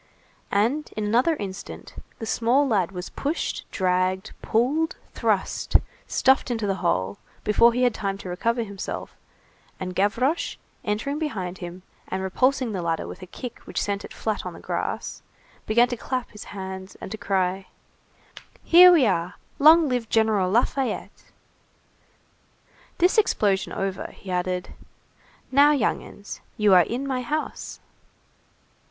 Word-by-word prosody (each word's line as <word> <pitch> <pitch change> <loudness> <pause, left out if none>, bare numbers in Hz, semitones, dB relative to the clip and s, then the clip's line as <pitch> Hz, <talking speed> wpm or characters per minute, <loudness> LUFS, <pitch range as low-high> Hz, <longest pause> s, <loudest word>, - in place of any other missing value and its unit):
And 240 +10 +1
in 215 - -1
another 245 +10 +3
instant, 195 -6 -7 0.2
the 225 - -5
small 245 +6 +2
lad 195 -7 +1
was 180 -1 -6
pushed, 300 +5 -3
dragged, 185 0 0
pulled, 280 +8 +1 0.2
thrust, - - -1 0.3
stuffed 265 0 +3
into 225 -3 -1
the 195 -1 0
hole, 95 +2 0 0.2
before 230 +3 +5
he 250 +2 0
had 245 -2 +3
time 195 -1 -3
to 190 - -8
recover 230 +6 0
himself, 200 -3 -6 0.6
and 185 -1 -4
Gavroche, 220 - +1 0.3
entering 220 +8 -2
behind 190 - -3
him, 175 +1 -8 0.2
and 190 0 -3
repulsing 255 +5 +1
the 190 -3 -3
ladder 165 -1 -1
with - - -9
a 185 - -8
kick 245 +5 -8
which - - -3
sent 200 -1 -2
it - - -9
flat 215 -2 -3
on - - -6
the - - -11
grass, - - -4 0.5
began 235 +3 +5
to 245 - -3
clap 255 +1 -3
his 210 - -10
hands 190 -1 -7
and - - -8
to 220 - -4
cry:— 190 -3 0 1.0
"Here 360 +2 +9
we 320 -7 +5
are! 180 -3 0 0.2
Long 315 +2 +7
live 245 -4 -1
General 220 -4 +2
Lafayette!" 250 +5 -1 1.7
This 365 +5 +4
explosion 200 - +1
over, 195 -1 -3
he 190 - -9
added:— 180 0 -2 0.8
"Now, 285 +3 +6
young 280 - +1
'uns, 205 - -10 0.2
you 210 -2 +4
are 180 - +8
in 245 +9 -2
my 260 -2 -1
house." 300 +5 -4
215 Hz, 145 wpm, -25 LUFS, 190-255 Hz, 1.7 s, Here